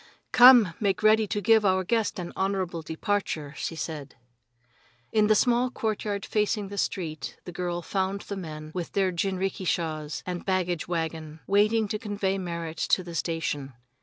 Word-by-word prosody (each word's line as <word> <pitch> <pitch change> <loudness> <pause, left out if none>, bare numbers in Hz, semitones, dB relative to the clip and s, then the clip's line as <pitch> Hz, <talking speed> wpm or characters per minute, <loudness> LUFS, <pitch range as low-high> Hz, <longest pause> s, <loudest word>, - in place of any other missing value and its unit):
"Come, 245 -7 +8
make 200 -1 0
ready 215 0 +5
to 205 - -2
give 220 +2 +5
our 190 -1 +3
guest 220 +2 0
an 175 -2 -5
honorable 190 -3 -1
departure," 160 -3 -2
she 165 - -4
said. 150 -4 -6 1.0
In 215 -1 +3
the 215 - +5
small 245 +2 +3
courtyard 215 -4 -2
facing 210 -1 0
the 200 - -7
street 155 -6 -3
the 180 - -8
girl 175 0 -3
found 195 +2 -1
the 200 - -6
men, 155 -4 -7
with 175 -2 -5
their 190 -2 +2
jinrikishas 175 -4 -2
and 180 -1 -4
baggage 180 -3 -1
wagon, 160 -2 -3
waiting 215 +2 +3
to 215 - -2
convey 200 -2 -1
Merrit 170 -3 -5
to 185 - +1
the 175 -1 -8
station. 155 -4 -2
185 Hz, 160 wpm, -27 LUFS, 165-205 Hz, 1.0 s, Come